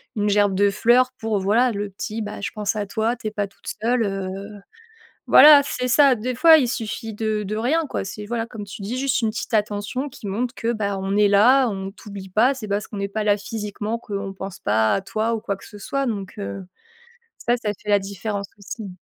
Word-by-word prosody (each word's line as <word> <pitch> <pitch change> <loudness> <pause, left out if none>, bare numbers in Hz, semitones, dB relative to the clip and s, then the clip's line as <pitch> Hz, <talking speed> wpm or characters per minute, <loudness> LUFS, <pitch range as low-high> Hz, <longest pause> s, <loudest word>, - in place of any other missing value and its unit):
une 210 0 +1
gerbe 205 -1 +3
de 200 +1 +3
fleurs 245 +5 +3
pour, 220 -2 -1
voilà, 230 +6 +3
le 205 -1 -3
petit: 215 +3 -5
«Bah, 210 -1 -6
je - - -3
pense 210 -1 -2
à 210 -1 -2
toi, 220 +4 -1
tu 225 - -6
es 215 - -3
pas 205 -1 -2
toute 195 - -27 0.2
seule», 235 +1 +2
heu, 195 +1 -5 0.7
voilà, 295 -1 +9
c'est 250 -2 -3
ça. 270 +1 +5
Des 245 +4 -3
fois, 320 +5 +7
il 255 -5 +2
suffit 225 -1 -4
de 215 0 -1
de 205 +2 -4
rien, 295 +9 +1
quoi. - - -3
C'est 210 +2 -7
voilà 230 +1 -3
comme 220 -3 -8
tu 200 0 -9
dis, 225 +6 -4
juste 270 -1 0
une 220 - +1
petite 220 +1 -5
attention 210 +6 -1
qui 235 - -12
montre 235 +6 -2
que 230 0 -1
bah, 200 -2 -2
on 195 +1 -2
est 210 0 +5
là, 240 +6 +5
on 195 -2 -5
t'oublie 200 -2 -10
pas. 240 +8 +3
C'est 220 -5 -7
pas 200 - 0
parce 210 - -7
qu'on 210 - -8
n'est 200 0 -2
pas 215 +2 -3
là 205 -1 +3
physiquement 210 +1 -4
qu'on 200 -3 -5
pense 190 -1 -7
pas 110 +1 +2
à 195 - -1
toi 220 +4 -1
ou - - -3
quoi 200 -1 -3
que 190 - -14
ce 210 - -12
soit. 275 +6 -2
Donc 200 -4 -4
heu, 195 -2 -5 0.7
ça 240 - +1
ça 210 -1 0
fait 210 - -9
la 205 -1 +5
différence 200 +1 -4
aussi. 205 +1 -7
210 Hz, 235 wpm, -22 LUFS, 200-235 Hz, 0.7 s, voilà